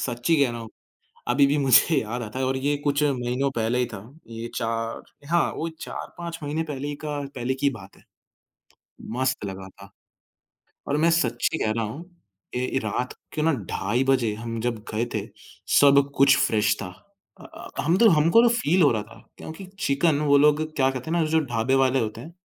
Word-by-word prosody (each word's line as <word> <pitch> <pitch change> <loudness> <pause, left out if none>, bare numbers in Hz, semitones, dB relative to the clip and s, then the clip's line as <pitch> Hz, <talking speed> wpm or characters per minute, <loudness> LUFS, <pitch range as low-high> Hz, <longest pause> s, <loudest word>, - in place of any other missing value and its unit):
सच्ची 125 +6 0
कह 125 - -1
रहा 120 0 -6
हूँ 115 - -8 0.6
अभी 140 +3 +4
भी 145 +2 +1
मुझे 140 +4 +5
याद 120 +3 -4
आता 110 +3 -6
है 130 - 0
और 130 - 0
ये 145 +2 0
कुछ 145 0 +1
महीनों 130 -1 0
पहले 115 +2 0
ही 125 - +1
था 105 - -8 0.3
ये 115 +1 -6
4 115 0 -3 0.3
हाँ, 170 0 +2
वो 165 - -3
4-5 170 -1 -7
महीने 150 +3 -2
पहले 145 -1 -5
का 150 -1 -3
पहले 125 +1 -2
की 140 +1 +1
बात 115 -6 -12
है। - - -23 1.1
मस्त 130 -3 0
लगा 95 -1 -7
था, - - -15 1.0
और 145 - 0
मैं 165 +2 +3
सच्ची 130 -2 +1
कह 110 - 0
रहा 115 - 0
हूँ 140 +11 -7 0.5
ए 125 +1 -1
रात 125 +4 -2 0.2
के 155 - -2
ना 160 +1 +3 0.2
ढाई 120 +7 0
बजे 120 -5 +2
हम 115 +1 -5
जब 120 0 -1 0.2
गए 110 +2 0
थे, - - -2 0.4
सब 140 0 +5
कुछ 140 0 +5
फ्रेश 105 -1 +2
था। 95 - -4 0.5
अ - - -12
अ, - - -11
हम 165 +5 +2
तो 225 +1 +6
हमको 170 +9 +5
फील 185 -7 +2
हो 145 - +5
रहा 110 -3 -1
था 110 +2 -17
क्योंकि 160 +5 -9
चिकन 145 -4 +1
वो 145 -1 +4
लोग 150 +1 +4
क्या 135 -1 +3
कहते 130 +4 -6
हैं 170 - +1
ना, 165 - +3
जो 160 +1 +2
ढाबे 120 +2 0
वाले 135 0 +3
होते 110 -2 -3
हैं, 165 - -11
135 Hz, 200 wpm, -24 LUFS, 115-150 Hz, 1.1 s, तो